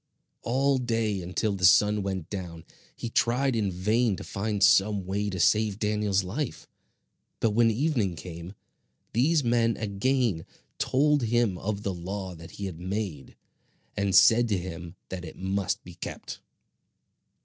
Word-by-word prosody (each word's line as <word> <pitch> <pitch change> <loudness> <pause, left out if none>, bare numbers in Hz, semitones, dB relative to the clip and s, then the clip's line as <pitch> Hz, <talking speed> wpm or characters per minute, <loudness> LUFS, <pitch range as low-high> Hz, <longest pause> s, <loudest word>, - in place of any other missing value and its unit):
All 135 +3 +1
day, 115 -5 -1
until 90 +4 -1
the 95 - -7
sun 105 +4 +5
went 95 -4 -3
down, 85 -5 -6 0.3
he - - -5
tried 120 +3 +1
in 105 -4 0
vain 105 +5 +1
to - - -8
find 105 0 -2
some 100 -1 +4
way 100 +2 -1
to 95 -2 -4
save 105 +3 +3
Daniel's 105 -2 0
life; 120 +10 -4 0.7
but 115 - +2
when 115 +2 +4
evening 115 - 0
came, 85 +3 -9 0.6
these 145 +6 +3
men 115 -1 +2
again 110 -3 0 0.3
told 145 +2 +2
him 115 -3 +1
of 105 0 -3
the 100 - -1
law 95 +2 -5
that 80 -1 -11
he 100 - -4
had 90 -4 -6
made, 95 -5 -4 0.6
and 100 -2 0
said 115 +6 +6
to 105 -3 +1
him 85 -1 -7
that 95 -1 -5
it 80 - -9
must 95 0 -2
be - - -11
kept. - - -7
105 Hz, 150 wpm, -27 LUFS, 95-115 Hz, 0.7 s, said